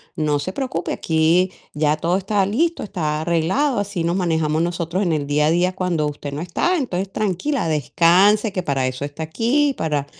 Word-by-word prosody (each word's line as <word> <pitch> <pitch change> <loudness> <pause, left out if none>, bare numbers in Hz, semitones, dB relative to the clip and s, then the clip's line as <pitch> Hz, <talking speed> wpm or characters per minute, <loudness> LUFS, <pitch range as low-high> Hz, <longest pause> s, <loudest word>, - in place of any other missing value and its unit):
"No 150 -2 +1
se 185 +5 -4
preocupe, 255 -11 -3
aquí 165 +3 +2 0.2
ya 150 0 +1
todo 170 +4 0
está 195 0 0
listo, 320 - 0
está 155 -7 -2
arreglado. 185 - +1
Así 200 -4 -3
nos 170 +2 0
manejamos 160 -4 0
nosotros 170 +2 -2
en 175 - 0
el 150 -2 -1
día 150 +1 +2
a 155 - +3
día 180 +2 +2
cuando 180 -5 0
usted 145 -1 -6
no 145 - -4
está. 260 - 0
Entonces, 195 - -3
tranquila, 215 - -1
descanse, 180 - +3
que 185 - -1
para 135 -5 0
eso 130 +2 -4
está 145 +3 -6
aquí, 265 - +1
para 150 -3 -1
170 Hz, 190 wpm, -21 LUFS, 155-200 Hz, 0.2 s, a